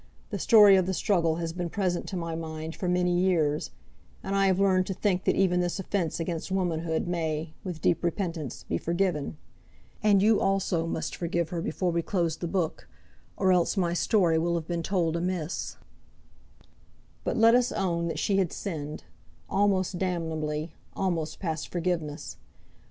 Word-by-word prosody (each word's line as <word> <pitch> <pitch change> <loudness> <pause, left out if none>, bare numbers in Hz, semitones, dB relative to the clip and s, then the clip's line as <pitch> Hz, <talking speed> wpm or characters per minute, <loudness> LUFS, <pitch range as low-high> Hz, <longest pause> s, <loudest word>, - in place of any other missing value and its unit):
The - - -3
story 210 -4 +7
of 185 -1 +1
the 190 - 0
struggle 170 -6 +2
has 165 0 -3
been 175 -1 -3
present 185 -2 -1
to 190 - -4
my 165 -1 -3
mind 160 0 -5
for 180 - -2
many 180 0 +2
years, 160 -5 +1 0.5
and 195 - -2
I 195 0 +4
have 190 0 +2
learned 185 -2 +3
to 190 - -3
think 190 -2 0
that - - +3
even 180 -2 +3
this 175 -1 -1
offence 185 -4 -1
against 165 +1 -3
womanhood 170 -4 -1
may, 160 -2 -2
with 180 -5 -6
deep 175 - +2
repentance, 170 - -3
be 85 - -2
forgiven. 170 -4 -1 0.6
And 205 -2 +4
you 215 0 +5
also 195 -4 +1
must - - -3
forgive 170 -1 -1
her 170 -1 -3
before 175 +2 -1
we 170 0 +1
close 170 -3 0
the 175 - -4
book, 170 -2 -2 0.5
or 190 -1 +3
else 180 +3 +2
my 175 -3 +1
story 175 -3 +3
will 170 +1 0
have 165 -2 -3
been 170 -1 -2
told 170 -2 0
amiss. 175 -1 -3 1.5
But - - -1
let 230 +1 +6
us 245 0 +3
own 170 -3 -1
that 165 - -3
she 195 - +1
had 185 -4 +1
sinned, 155 -6 -5 0.5
almost 195 -2 +1
damnably, 160 -3 -2 0.2
almost 170 -5 -2
past 160 -4 -3
forgiveness. 165 -4 -3
175 Hz, 170 wpm, -28 LUFS, 165-190 Hz, 1.5 s, story